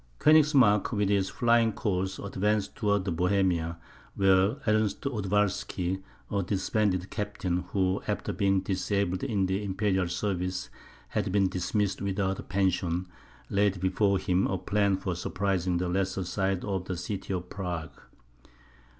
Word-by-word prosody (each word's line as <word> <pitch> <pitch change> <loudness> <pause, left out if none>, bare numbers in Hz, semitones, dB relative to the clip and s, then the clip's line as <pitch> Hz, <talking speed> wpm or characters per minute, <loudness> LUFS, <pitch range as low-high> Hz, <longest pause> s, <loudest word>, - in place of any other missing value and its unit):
Koenigsmark, 140 - +5
with 105 -2 +1
his 100 -2 +2
flying 115 -2 +3
corps, 95 -3 -1
advanced 105 +1 0
towards 100 -6 0
Bohemia, 90 -1 +1 0.4
where 95 +2 +4
Ernest 110 -2 +1
Odowalsky, 100 - -1 0.3
a 100 - +1
disbanded 95 0 0
captain, 95 -4 -2
who, 95 -1 +1
after - - -2
being 95 -1 +2
disabled 95 -1 -1
in 105 -8 +1
the 95 +2 -1
imperial 95 -2 0
service, 90 0 -2 0.4
had - - -1
been 100 -1 +3
dismissed 95 +2 -1
without 95 -1 -1
a - - -3
pension, 90 -2 0 0.4
laid 100 -1 +2
before 95 +2 +2
him 95 0 +1
a 95 - -1
plan 100 0 +1
for 95 -2 -3
surprising 90 0 -1
the 90 +1 -1
lesser 95 +1 -1
side 95 +1 -1
of 95 -3 -2
the 90 -2 -4
city 95 +3 -5
of 90 -1 -4
Prague. 90 -5 -4
95 Hz, 135 wpm, -28 LUFS, 90-105 Hz, 0.4 s, Koenigsmark